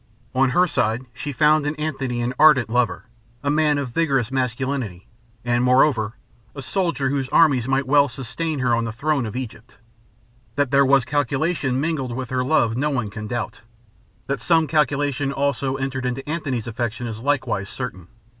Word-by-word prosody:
On 135 0 +3
her 180 +8 +4
side 115 -7 0
she 145 +4 -5
found 150 +1 +3
in 145 - -2
Antony 135 -5 -3
an 125 +1 -1
ardent 150 -7 +6
lover, 125 0 0 0.4
a 140 - +1
man 150 -1 +2
of 140 -3 -2
vigorous 135 -5 +1
masculinity, 130 -6 -2 0.4
and, 120 0 +1
moreover, 125 -4 +3 0.4
a 140 - -6
soldier 165 -6 0
whose 135 -2 -1
armies 135 -7 +4
might 135 +1 +1
well 140 +1 +4
sustain 135 +6 -4
her 125 -2 +2
on 115 0 +1
the 115 - -3
throne 140 +1 -1
of 110 - -7
Egypt. 125 -1 -7 0.8
That 145 -3 0
there 140 0 +5
was 135 -2 +4
calculation 140 0 0
mingled 140 -5 -2
with 130 -1 -5
her 130 0 0
love, 120 -5 +2
no 145 +5 0
one 120 -8 -2
can 105 -1 -6
doubt. 120 +3 -4 0.6
That 140 -2 -2
some 160 +5 +3
calculation 145 -2 0
also 140 -1 -1
entered 135 -1 -3
into 130 +3 -4
Antony's 145 -7 -2
affection 120 0 -3
is 110 -2 -5
likewise 125 -6 -1
certain. 95 -9 -6
135 Hz, 175 wpm, -22 LUFS, 120-145 Hz, 0.8 s, ardent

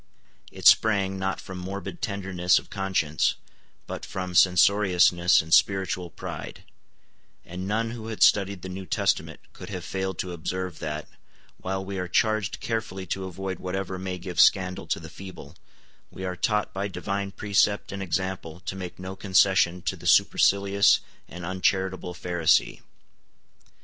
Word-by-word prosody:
It - - -10
sprang, 100 -3 +5
not 95 0 -2
from 95 -1 -8
morbid 100 - -6
tenderness 95 -3 +1
of - - -5
conscience, 95 -6 0 0.5
but - - -6
from 90 -1 -5
censoriousness 90 -1 +4
and 80 +1 -3
spiritual 95 -1 +2
pride; - - -8 0.8
and 90 +2 -6
none 115 +2 -1
who 115 -2 -7
had 110 -1 0
studied 100 -3 +3
the - - -5
New 95 0 -7
Testament - - -1
could - - -10
have - - -6
failed 95 -2 -3
to 90 -1 -4
observe 90 +1 -4
that, 75 0 -4 0.5
while 95 +1 -3
we 100 0 -4
are 90 - -3
charged 110 +2 +1
carefully 110 -5 -3
to 95 -1 -5
avoid 95 +1 -5
whatever 95 0 -4
may 95 -1 -4
give 90 -1 -6
scandal 90 -1 +3
to - - -1
the - - -9
feeble, 95 -5 -11 0.5
we 95 - -7
are 90 -1 -3
taught 105 +3 0
by 100 +1 -2
divine 100 0 -3
precept 100 0 +1
and 100 0 -5
example 95 -2 -3
to 95 0 -5
make 90 -2 -7
no 95 +1 -7
concession 95 -2 +3
to - - -1
the - - -8
supercilious 100 0 +4 0.3
and 90 0 -8
uncharitable 95 0 -1
Pharisee. 85 -3 +1
95 Hz, 150 wpm, -26 LUFS, 90-100 Hz, 0.8 s, sprang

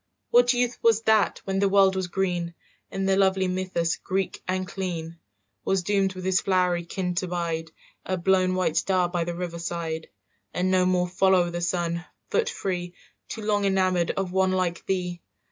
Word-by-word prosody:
"What 245 0 +6
youth 245 -1 0
was 225 -1 +3
that, 220 -2 +3
when 195 0 -1
the 200 0 +3
world 195 -1 +5
was 190 -1 -1
green, 175 -2 -2 0.3
In 195 0 -3
the 195 0 +3
lovely 190 -1 +3
mythus 180 -2 -1
Greek 190 0 -2
and 185 0 -1
clean, 170 -4 -5 0.4
"Was 195 -2 +1
doomed 195 0 +1
with 185 0 -7
his 185 0 +2
flowery 180 -2 +1
kin 180 +1 -3
to 185 +1 -1
bide, 165 -2 -2 0.3
A 185 - -2
blown 185 +1 +2
white 180 -4 0
star 185 -2 +2
by 175 -1 -1
the 175 0 -4
river 170 -1 -5
side, 165 -1 -4 0.5
"And 185 +1 +1
no 185 -1 +3
more 180 -1 +2
follow 185 -1 +3
the 175 0 -4
sun, 170 -1 -1 0.3
foot 460 - +1
free, 175 -2 -4 0.3
Too 220 - -6
long 205 -1 +1
enamoured 185 -3 +2
of 190 -2 -2
one 190 0 +2
like 180 -2 -1
thee? 180 -2 -2
185 Hz, 180 wpm, -25 LUFS, 175-190 Hz, 0.5 s, What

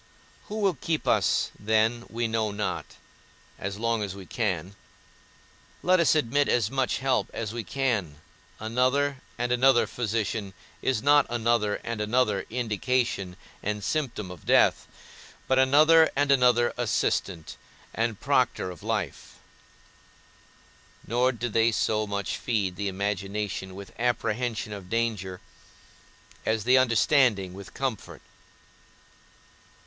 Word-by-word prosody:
Who 210 - -6
will 195 -2 +3
keep 155 +3 -3
us - - +2
then 110 +3 +1
we 115 +1 -1
know 110 -1 0
not; 105 +1 -4 0.6
as 100 +1 -4
long 115 0 0
as 100 -2 -4
we 95 -1 -10
can, 95 -3 -2 1.1
let 185 +1 +4
us 170 - +4
admit 145 0 +2
as 115 -3 +1
much 135 -1 0
help 130 -1 0
as 110 -2 -4
we 115 -1 -4
can; 105 - -1 0.4
another 130 +5 +1 0.2
and 120 0 -1
another 125 0 +4
physician 110 -3 -3 0.3
is 130 -4 0
not 145 +1 +5
another 115 -3 +1
and 115 -2 -4
another 105 -2 +1
indication 115 -4 -1 0.3
and 105 0 -3
symptom 125 -11 -2
of 90 -4 -11
death, - - +3 0.6
but 130 0 +3
another 155 +5 +6
and 145 0 +2
another 125 -3 +4
assistant, 100 -7 -1 0.4
and 115 -2 -1
proctor 90 - +1
of 90 - -12
life: - - -4 1.7
nor 125 +3 +2
do 120 -1 -4
they 115 +1 +2
so 110 -1 0
much 100 0 -3
feed 100 -7 -1
the 100 +2 -3
imagination 100 0 -3
with 100 0 -10
apprehension 120 -2 -1
of 95 -3 -9
danger, 105 -5 -2 1.0
as 110 -1 0
the 130 +3 +5
understanding 115 -5 +3
with 100 0 -11
comfort. 130 -6 -4
115 Hz, 125 wpm, -27 LUFS, 100-125 Hz, 1.7 s, another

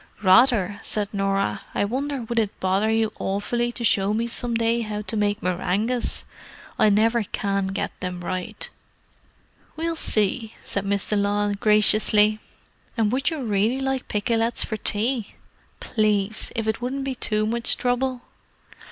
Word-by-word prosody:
"Rather!" 205 -1 +4
said 205 -1 -2
Norah. 195 0 0
"I - - +2
wonder 270 +4 -2
would 235 +1 -1
it 210 -3 -2
bother 190 +3 +1
you 220 -1 +1
awfully 235 +5 -1
to 240 - -6
show 205 -2 +2
me 230 +2 0
some 235 0 -3
day 230 +1 +1
how 210 -1 -4
to 220 - -3
make 205 -1 0
meringues? 190 +7 0 0.5
I 215 - +5
never 225 +3 +3
can 200 -1 -1
get 195 +1 -2
them 180 -1 -5
right." 185 +4 -4 1.1
"We'll 330 +1 -2
see," 220 -4 0
said 200 0 -3
Miss 200 0 -1
de 210 - +1
Lisle 205 0 +1
graciously. 210 0 +4 0.6
"And 215 -2 +2
would 265 +2 +1
you 315 -5 -4
really 220 +3 +1
like 265 -1 -2
pikelets 225 +2 +1
for 220 - -3
tea?" 220 +2 -1 0.4
"Please—if 215 0 -1
it 220 +1 -1
wouldn't 265 +3 -2
be 270 -1 -2
too 215 -3 +1
much 230 +2 0
trouble." 250 0 -1
215 Hz, 150 wpm, -24 LUFS, 205-235 Hz, 1.1 s, I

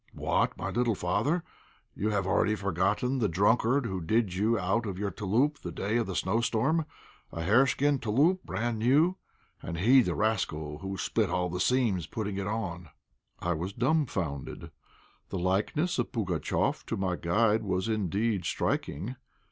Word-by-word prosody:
"What, - - 0
my - - -3
little 120 -2 +1
father, 140 - 0 0.5
you 105 - -1
have 100 -3 0
already 105 +2 +2
forgotten 105 +7 0
the 110 - +2
drunkard 115 +8 +2
who 95 -5 -3
did 105 +3 +1
you 110 +5 +1
out 105 +4 0
of 95 -2 -4
your 100 0 -2
'touloup' 120 - 0
the - - -6
day 105 +4 -1
of 120 - 0
the 95 - -4
snowstorm, 115 - +1 0.4
a 85 - -4
hareskin 135 - +3
'touloup,' 145 - +2
brand 115 +4 -2
new. 150 - +3 0.4
And 85 - -5
he, 125 +9 +6
the - - -1
rascal, 80 -9 -1
who 95 +2 -5
split 105 +2 0
all 90 0 -1
the 90 - -3
seams 110 -7 +1
putting 105 -3 -4
it 100 - -3
on." 90 -7 -4 0.5
I 85 - 0
was 90 +4 -4
dumbfounded. 115 - -1 0.6
The - - -3
likeness 100 - 0
of - - -1
Pugatchéf 95 - -1
to - - -2
my 95 -2 0
guide 105 +6 +2
was 95 -1 -1
indeed 105 -1 0
striking. 100 - -2
105 Hz, 160 wpm, -29 LUFS, 90-120 Hz, 0.6 s, he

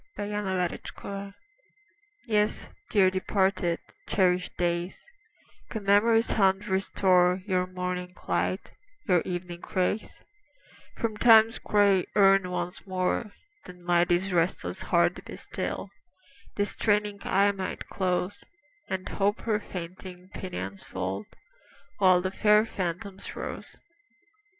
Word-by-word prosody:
DEPARTED 200 -4 -2 0.2
DAYS 200 0 -6 0.9
YES, 210 -3 0 0.2
dear 190 -3 +4
departed, 185 -2 +1 0.3
cherished 180 -2 +1
days, 175 +1 -1 0.7
Could 220 -3 -5
Memory's 225 +3 +4
hand 195 0 +2
restore 185 -1 +2
Your 185 -3 0
morning 180 0 -4
light, 185 - -1 0.4
your 180 -4 +4
evening 175 -1 -5
rays, 185 +3 -1 0.7
From 220 -2 -2
Time's 225 0 +6
gray 200 -3 +3
urn 195 -2 +5
once 180 +2 -4
more, 185 +3 -1 0.4
Then 180 -1 -12
might 175 0 +3
this 180 +2 +1
restless 175 0 0
heart - - +2
be - - -9
still, - - -5 0.6
This 205 0 0
straining 210 -1 0
eye 200 +1 +3
might 190 -2 -5
close, 185 +1 -2 0.5
And 190 -1 -3
Hope 205 +1 0
her 215 -2 0
fainting 180 -1 -8
pinions 100 - -6
fold, 95 +2 -4 0.7
While 185 -2 +5
the 185 +1 -2
fair 210 +2 +4
phantoms 185 0 -5
rose. - - -7
190 Hz, 110 wpm, -28 LUFS, 180-205 Hz, 0.9 s, Time's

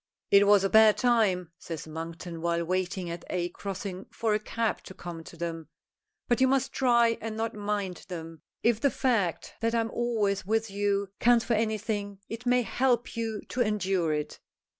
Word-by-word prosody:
"It 200 0 +7
was 205 -1 +6
a 195 - +2
bad 220 -1 +7
time," 210 -8 +2
says 165 -4 -6
Monkton 165 +1 -6
while 170 0 0
waiting 185 +1 -1
at 170 - -6
a 175 -1 -1
crossing 195 0 -6
for 225 -2 0
a 210 - +2
cab 225 +1 -2
to 190 - -10
come 170 -2 -7
to 170 - -11
them. 165 -1 -4 0.6
"But 240 +1 +2
you 260 - +6
must 265 0 +1
try 235 -3 +3
and 220 0 -4
not 225 +1 -1
mind 205 -3 -3
them. 165 -3 -7 0.2
If 230 -1 +3
the 280 - +4
fact 225 -10 0
that 230 0 0
I - - +3
am 225 0 -1
always 220 -5 0
with 220 +2 0
you 200 0 0
counts 240 -1 +4
for 235 - +1
anything, 215 -2 -1
it 230 +2 -6
may 250 0 +4
help 245 0 0
you 225 -2 -2
to 255 - -1
endure 195 -6 +1
it." 150 -1 -3
205 Hz, 185 wpm, -28 LUFS, 180-230 Hz, 0.6 s, It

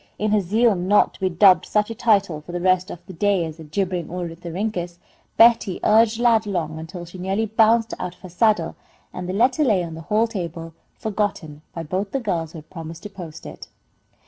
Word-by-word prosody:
In 215 0 -1
her 210 -1 +3
zeal 220 +5 +3
not 190 +3 +2
to - - -17
be 190 - +1
dubbed 185 +2 +5
such 210 +1 +1
a - - -2
title 200 -9 +1
for 175 +3 -11
the 175 - -2
rest 185 +1 +2
of 170 - -9
the 190 - -10
day 195 -1 +1
as 160 0 -8
a - - -8
jibbering 180 +2 -2
ornithorhynchus, 175 +1 -4 0.4
Betty 225 -5 +5
urged 220 +1 +4
Lad 230 -3 +3
along 160 -5 -3
until 175 +2 -8
she 175 +2 -11
nearly 195 +4 -1
bounced 225 +1 +3
out 180 - -5
of - - -30
her 185 - -10
saddle, 180 -2 +1 0.4
and 180 0 -6
the - - -2
letter 250 +8 +2
lay 210 -9 +2
on 165 -1 -6
the 160 - -8
hall 215 +6 +1
table, 170 -7 -6 0.2
forgotten 200 -8 -3
by 165 - -6
both 185 +6 -3
the 270 - 0
girls 170 -9 -3
who - - -8
had 155 0 -13
promised 165 -1 -8
to 210 - -8
post 175 -5 -10
it. - - -9
185 Hz, 215 wpm, -22 LUFS, 170-215 Hz, 0.4 s, dubbed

